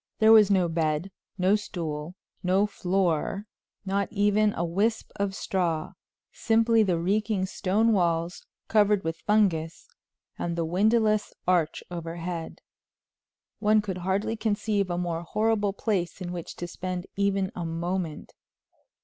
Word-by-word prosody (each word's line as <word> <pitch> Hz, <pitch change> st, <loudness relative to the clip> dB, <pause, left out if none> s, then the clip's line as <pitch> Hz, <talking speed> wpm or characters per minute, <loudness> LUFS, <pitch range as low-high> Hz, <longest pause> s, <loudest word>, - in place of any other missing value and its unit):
There 220 Hz, 0 st, +5 dB
was 215 Hz, -2 st, +8 dB
no 185 Hz, -3 st, +3 dB
bed, 160 Hz, +2 st, -1 dB, 0.3 s
no 190 Hz, +2 st, +3 dB
stool, 165 Hz, -5 st, -4 dB, 0.3 s
no 190 Hz, +3 st, +3 dB
floor, 190 Hz, -1 st, -1 dB, 0.4 s
not 195 Hz, +1 st, -1 dB
even 210 Hz, 0 st, +3 dB
a 170 Hz, -, -1 dB
wisp 205 Hz, +7 st, 0 dB
of 200 Hz, 0 st, 0 dB
a -, -, -11 dB
straw; 170 Hz, -5 st, -1 dB, 0.4 s
simply 225 Hz, 0 st, +3 dB
the 185 Hz, -5 st, +2 dB
reeking 200 Hz, +2 st, 0 dB
stone 210 Hz, +4 st, +1 dB
walls, 170 Hz, -2 st, 0 dB, 0.2 s
covered 210 Hz, -2 st, +3 dB
with 165 Hz, 0 st, -3 dB
fungus, 185 Hz, -7 st, +1 dB, 0.5 s
and 170 Hz, -1 st, -2 dB
the 170 Hz, -1 st, -1 dB
windowless 215 Hz, +4 st, +2 dB
arch 175 Hz, -4 st, +1 dB
overhead. 170 Hz, 0 st, -5 dB, 1.0 s
One 215 Hz, 0 st, +4 dB
could 195 Hz, -3 st, -3 dB
hardly 190 Hz, +5 st, -1 dB
conceive 210 Hz, -2 st, 0 dB
a 175 Hz, -, -1 dB
more 170 Hz, -2 st, -2 dB
horrible 210 Hz, +3 st, 0 dB
place 195 Hz, -5 st, -2 dB
in 180 Hz, -2 st, -5 dB
which 175 Hz, -2 st, -6 dB
to 175 Hz, -, -5 dB
spend 180 Hz, 0 st, -5 dB
even 195 Hz, -1 st, 0 dB
a 175 Hz, -, -5 dB
moment. 170 Hz, 0 st, -3 dB
190 Hz, 135 wpm, -27 LUFS, 170-210 Hz, 1.0 s, was